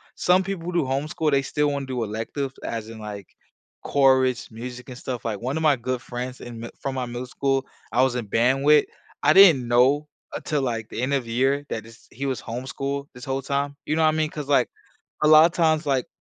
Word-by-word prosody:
some 180 +1 +3
people 180 -2 -4
do 170 -4 +1
homeschool, 145 +3 -1
they 140 - +3
still 150 +1 0
wanna 140 -1 -3
do 125 -3 -3
electives 115 +6 -4
as 115 -1 -4
in, 115 -1 -9
like, 105 -2 -7 0.6
chorus, 130 -3 +2
music, 125 +2 -8
and 125 - -8
stuff, 125 -2 -5
like, 105 -3 -3
one 130 +6 -2
of 160 - -2
my 150 -2 +5
good 125 0 -3
friends 125 +1 -6
in 120 -2 -8
mi 115 - -6
from 135 -1 -3
my 130 - -2
middle 120 +1 -5
school 135 +1 0 0.3
I 125 - +3
was 130 -2 +1
in 120 -4 -3
band 125 +6 +2
with, 150 0 +6 0.4
I 150 +2 +6
didn't 165 -11 +7
know 130 +5 +3 0.3
until, 150 -2 -2
like, 115 -4 -2
the - - -5
end 130 +3 0
of 135 -3 0
the 115 - -7
year 135 +4 +1
that 110 - -4
this 115 0 -17
he 135 +4 -5
was 135 -2 -2
homeschooled 135 +4 -4
this 125 +1 -10
whole 135 0 -2
time. 140 +1 -2
You 155 - 0
know 160 - +1
what 155 - +5
I - - +3
mean? 155 0 0
'Cause, 150 -2 -6
like, 145 - +3 0.5
a - - +5
lotta 155 +2 +8
times, 160 -2 +2
like, 135 -3 0
135 Hz, 230 wpm, -24 LUFS, 120-145 Hz, 0.6 s, lotta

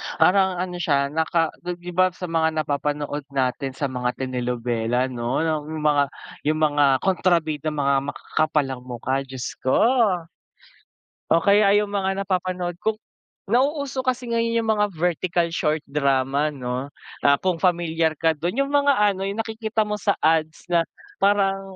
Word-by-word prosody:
parang 190 0 +4
ano 180 0 -4
siya 140 -4 +1
naka 160 +1 +1
dun, 175 0 -4
di 175 0 -9
ba, 185 +1 +4
sa - - -11
mga 160 -1 +1
napapanood 145 0 -2
natin 135 0 -1
sa 140 -1 -2
mga 125 -1 -2
telenovela 125 -1 -1
no 120 +4 -1
yung 155 -1 -2
mga 145 -2 +4 0.4
yung 155 +1 +1
mga 145 -1 +3 0.2
kontrabida 170 -5 +1
mga 140 -2 +1 0.2
makakapal 155 -1 0
ang 130 - -5
mukha, 125 +2 -2
Diyos 130 -1 -5
ko. 130 - +1 1.6
O 165 - +6
kaya 200 +3 +4
yung 205 -1 -2
mga 195 -1 0
napapanood 180 -1 -1
ko, 220 0 0 0.5
nauuso 270 +3 0
kasi 255 -1 -1
ngayon 230 0 0
yung 225 - -4
mga 210 -1 +1
vertical 175 0 0
short 155 -1 +1
drama, 140 +1 +1
no? 130 -1 -4 0.3
Ah, 140 0 +5
kung 180 -3 -1
familiar 165 -3 +1
ka 165 -1 +2
dun, 175 - -3
yung 275 - +3
mga 285 0 +3
ano 205 -2 +2
yung 200 +2 -3
nakikita 220 -1 -1
mo 210 - -2
sa 210 -1 0
ads 160 0 +1
na 175 -1 +3 0.4
parang, 195 -1 +3
165 Hz, 155 wpm, -23 LUFS, 140-195 Hz, 1.6 s, O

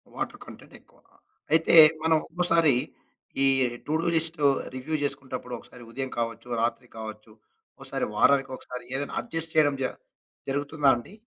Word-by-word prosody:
Water - - -5
content - - -14
ఎక్కువ. - - -28 0.6
అయితే 165 +1 +4 0.3
మనం 160 0 +4
ఒక్కోసారి 165 -4 +2 0.7
ఈ - - +4 0.4
టు 150 - -2
డు 170 - -2
లిస్ట్ 165 +1 +3 0.4
రివ్యూ 130 +5 -3
చేసుకున్నప్పుడు 130 -3 -5
ఒకసారి 125 - -14
ఉదయం 135 +2 -4
కావచ్చు, 115 0 -4
రాత్రి 120 +1 -2
కావచ్చు 110 0 -9 0.5
ఒకసారి - - -3
వారానికి 135 +3 +3
ఒకసారి 125 0 -9
ఏదైనా 140 +1 -3
అడ్జస్ట్ 165 0 -4
చేయడం 145 -2 +4
జ - - +1 0.6
జరుగుతుందా 145 +1 +1
అండి? 120 +11 -9
140 Hz, 140 wpm, -26 LUFS, 125-160 Hz, 0.7 s, అయితే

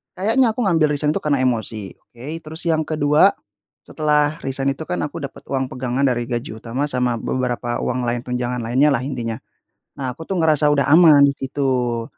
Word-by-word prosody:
kayaknya 225 +4 +2
aku 250 - -1
ngambil 165 -5 +3
resign 150 +1 0
itu - - -1
karena 140 -3 0
emosi 110 -5 -2
oke, 120 +1 -15 0.2
terus 160 +2 -6
yang 160 -2 +1
kedua 155 +5 +3 0.5
setelah 150 -1 +1
resign 135 +1 -1
itu 160 - -7
kan 180 - -2
aku 160 +3 -6
dapat 140 - -8
uang 130 -1 -1
pegangan 130 +1 -2
dari 120 -2 -1
gaji 120 -1 -4
utama 120 +5 -3
sama 125 -1 0
beberapa 120 -1 -2
uang 125 0 -1
lain 120 0 0
tunjangan 125 0 -2
lainnyalah 130 +4 +2
intinya. 120 -4 -4 0.6
Nah 130 -2 -2
aku 160 - -8
tuh 190 - -1
ngerasa 155 -2 +3
udah 140 -1 +1
aman 160 -4 +7
di 140 - +2
situ. 130 -4 -1
135 Hz, 180 wpm, -20 LUFS, 125-155 Hz, 0.6 s, aman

